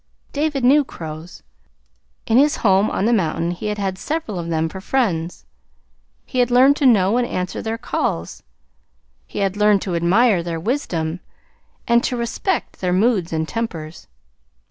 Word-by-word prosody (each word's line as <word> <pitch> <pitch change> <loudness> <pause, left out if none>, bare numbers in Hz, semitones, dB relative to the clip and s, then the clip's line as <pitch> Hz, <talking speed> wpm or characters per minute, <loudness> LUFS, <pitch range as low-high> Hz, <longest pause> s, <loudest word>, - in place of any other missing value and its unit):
David 290 -2 -1
knew 285 +4 +5
crows. 160 - -9 0.8
In 230 +3 +4
his 295 +1 +4
home 195 +1 +4
on 195 - -1
the 235 - +3
mountain 170 -4 0
he 175 +4 -5
had 210 0 -2
had 195 -2 -3
several 295 - -3
of 170 - -5
them 160 -1 0
for 190 +4 -8
friends. 180 -9 -1 0.8
He 255 - -3
had 245 -1 +3
learned 260 +3 +5
to 280 - +3
know 210 -2 +4
and 245 -1 +1
answer 180 +1 -3
their 225 0 -3
calls. 85 - -3 0.9
He - - -10
had 195 0 -2
learned 210 -1 +3
to 185 - -3
admire 185 +4 +3
their 165 -1 -4
wisdom 170 - -2 0.7
and 235 0 +4
to 250 - -1
respect 240 - -2
their 180 -1 0
moods 195 -3 +2
and 160 -1 -1
tempers. 170 -9 -5
200 Hz, 165 wpm, -20 LUFS, 170-245 Hz, 0.9 s, knew